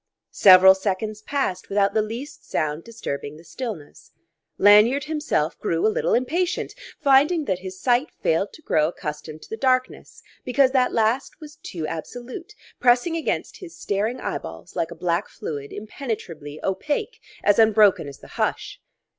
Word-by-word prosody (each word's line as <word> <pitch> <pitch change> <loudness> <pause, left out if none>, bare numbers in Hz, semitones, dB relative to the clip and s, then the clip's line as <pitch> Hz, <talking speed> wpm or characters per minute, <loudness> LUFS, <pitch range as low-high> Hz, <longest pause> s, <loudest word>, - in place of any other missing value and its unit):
Several 190 -1 +8
seconds 205 +2 -3
passed 215 -8 -2
without 200 0 +2
the 220 - +3
least 230 +7 -7
sound 155 0 -1
disturbing 150 -10 -6
the 165 - -15
stillness. 185 - -8 0.5
Lanyard 210 +7 +6
himself 300 - -1
grew 165 0 0
a 215 - +3
little - - +1
impatient, 335 +9 -1 0.3
finding 290 +4 +4
that 185 -6 -1
his 185 0 -8
sight 250 +5 +2
failed 165 +5 +1
to 315 - -15
grow 155 -1 +2
accustomed 155 -2 -7
to - - -15
the 220 - -4
darkness 255 0 -1 0.2
because 260 +1 +3
that 255 -2 +2
last 230 +7 0
was 305 -1 -12
too 165 - -6
absolute, 245 - -7 0.3
pressing 250 +7 +3
against 325 - -2
his 355 -3 -11
staring 215 +5 -2
eyeballs 80 - -6
like 165 - -1
a 170 - -9
black 170 +3 -1
fluid 140 -2 -6
impenetrably 205 - -6
opaque, 295 - -2 0.2
as 205 - +4
unbroken 215 -7 +5
as 140 - -9
the - - -15
hush. - - -2
215 Hz, 155 wpm, -23 LUFS, 170-260 Hz, 0.5 s, Several